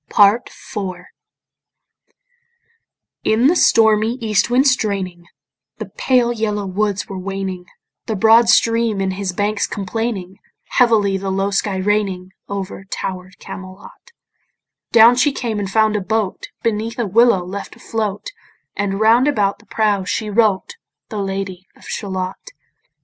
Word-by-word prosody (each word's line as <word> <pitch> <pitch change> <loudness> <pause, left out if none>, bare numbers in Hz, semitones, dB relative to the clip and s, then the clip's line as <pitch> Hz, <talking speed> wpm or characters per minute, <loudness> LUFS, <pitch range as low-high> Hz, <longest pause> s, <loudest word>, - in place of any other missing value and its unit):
PART 205 +4 +4
IV 185 -4 -7 2.2
In 220 +3 +2
the 325 +6 +5
stormy 220 -6 +4
east 220 -4 0
wind 255 +3 +3
straining, 195 -9 -1 0.5
The - - -7
pale 245 0 +1
yellow 210 -3 -2
woods 200 +1 -1
were 195 -1 -6
waning, 190 -1 -5 0.4
The 220 - -1
broad 225 +3 +5
stream 230 -2 +3
in 190 -1 0
his 190 0 -3
banks 205 +3 -1
complaining, 195 -2 -4 0.3
Heavily 215 -5 +3
the 195 0 -4
low 195 +1 -1
sky 195 0 0
raining 190 -2 -1 0.2
Over 195 -1 -5
tower'd 185 -1 -6
Camelot; 190 - -11 0.8
Down 235 +1 +7
she 285 +3 +3
came 230 -5 -3
and 200 -2 -3
found 215 +1 +2
a 210 - 0
boat 215 0 -2 0.2
Beneath 225 0 -2
a 240 - 0
willow 210 -2 +3
left 195 +2 -7
afloat, 220 - -4 0.4
And 200 -1 -2
round 230 +5 +4
about 205 -8 +1
the - - -22
prow 210 -3 +1
she 210 +3 -3
wrote 220 - +1 0.3
The 215 -3 -4
Lady 195 -1 -4
of - - -18
Shalott. 190 - -5
205 Hz, 135 wpm, -19 LUFS, 195-225 Hz, 2.2 s, Down